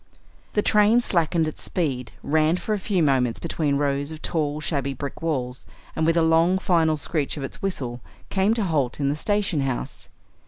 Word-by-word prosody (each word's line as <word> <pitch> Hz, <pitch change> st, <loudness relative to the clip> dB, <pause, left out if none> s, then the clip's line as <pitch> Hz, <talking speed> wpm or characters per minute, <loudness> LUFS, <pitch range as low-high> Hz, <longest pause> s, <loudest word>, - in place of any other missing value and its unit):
The 210 Hz, -, +2 dB
train 210 Hz, +3 st, +5 dB
slackened 170 Hz, -6 st, +1 dB
its 155 Hz, -, -6 dB
speed, 135 Hz, -8 st, -2 dB
ran 155 Hz, +3 st, +2 dB
for 215 Hz, -, -2 dB
a 210 Hz, -, -1 dB
few 190 Hz, -3 st, 0 dB
moments 130 Hz, -5 st, +2 dB
between 155 Hz, -4 st, -1 dB
rows 140 Hz, +1 st, 0 dB
of 155 Hz, -, -7 dB
tall, 150 Hz, -3 st, -1 dB
shabby 140 Hz, -3 st, -2 dB
brick 140 Hz, +2 st, -6 dB
walls, 130 Hz, -6 st, -2 dB, 0.3 s
and 160 Hz, 0 st, +1 dB
with 165 Hz, +1 st, +3 dB
a 165 Hz, -, +4 dB
long, 165 Hz, +3 st, +4 dB
final 165 Hz, -4 st, +2 dB
screech 150 Hz, 0 st, -1 dB
of 140 Hz, -, -4 dB
its 135 Hz, -, -7 dB
whistle 125 Hz, -11 st, -3 dB, 0.3 s
came 200 Hz, +3 st, +2 dB
to 225 Hz, -, 0 dB
halt 150 Hz, -9 st, 0 dB
in 140 Hz, -1 st, +1 dB
the 145 Hz, -, 0 dB
station 205 Hz, 0 st, 0 dB
house. 135 Hz, -3 st, -3 dB
155 Hz, 190 wpm, -24 LUFS, 140-180 Hz, 0.3 s, train